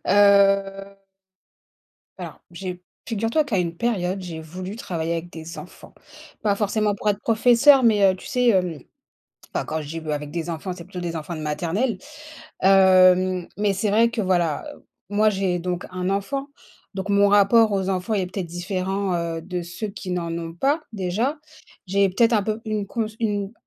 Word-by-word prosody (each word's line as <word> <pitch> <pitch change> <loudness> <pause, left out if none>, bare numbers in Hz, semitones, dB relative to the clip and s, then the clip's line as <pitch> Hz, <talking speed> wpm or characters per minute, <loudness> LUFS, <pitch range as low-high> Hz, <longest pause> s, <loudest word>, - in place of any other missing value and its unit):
Heu 195 -1 +3 1.1
alors - - -8
j'ai 180 0 -6 0.3
figure 225 0 -1
toi 310 +5 +2
qu'à 235 -9 -1
une 170 -1 -2
période, 195 -5 -1
j'ai 170 -3 -6
voulu 185 +6 -7
travailler 170 -6 -3
avec 170 +1 -5
des 165 0 -9
enfants. - - -12 0.5
Pas 205 -2 +2
forcément 210 0 0
pour 210 - -3
être 205 0 -3
professeur, 245 +4 +5
mais, 205 -5 +5
heu, - - -7
tu - - -13
sais, 250 -1 +1
hem 180 -7 +2 0.8
enfin, - - -1
quand 160 +1 -3
je 145 - -9
dis 165 +2 -5
b 160 - -9
avec 150 -1 -3
des 170 +1 -4
enfants, 170 +3 -4
c'est 175 -2 -9
plutôt 185 -1 -8
des 170 -1 -4
enfants 160 +2 -5
de - - -6
maternelle. 180 - -1 0.6
Hem, 185 -1 +5
mais 205 -1 +1
c'est 200 +2 -1
vrai 230 +3 +4
que 230 - -3
voilà, 175 -5 0 0.4
moi 210 +2 +3
j'ai 190 -3 -1
donc 180 0 -3
1 185 0 -2
enfant, 270 +9 -2 0.5
donc 190 +1 -4
mon 200 0 +4
rapport 205 +2 +5
aux 195 -1 0
enfants 190 +3 -1
est 190 -3 0
peut-être 185 0 -5
différent, 185 +2 -2
heu, 170 -1 -2
de 180 0 -4
ceux 175 +5 -6
qui 195 -2 -7
n'en 170 -2 -2
ont 165 -1 -5
pas, 275 - +1
déjà. 220 - -1 0.5
J'ai 195 +1 +2
peut-être 230 +5 +3
un 210 - +3
peu 215 +2 -2
une 215 -2 -2
cons 225 +2 -2
une 205 -3 -1
195 Hz, 185 wpm, -23 LUFS, 175-210 Hz, 1.1 s, professeur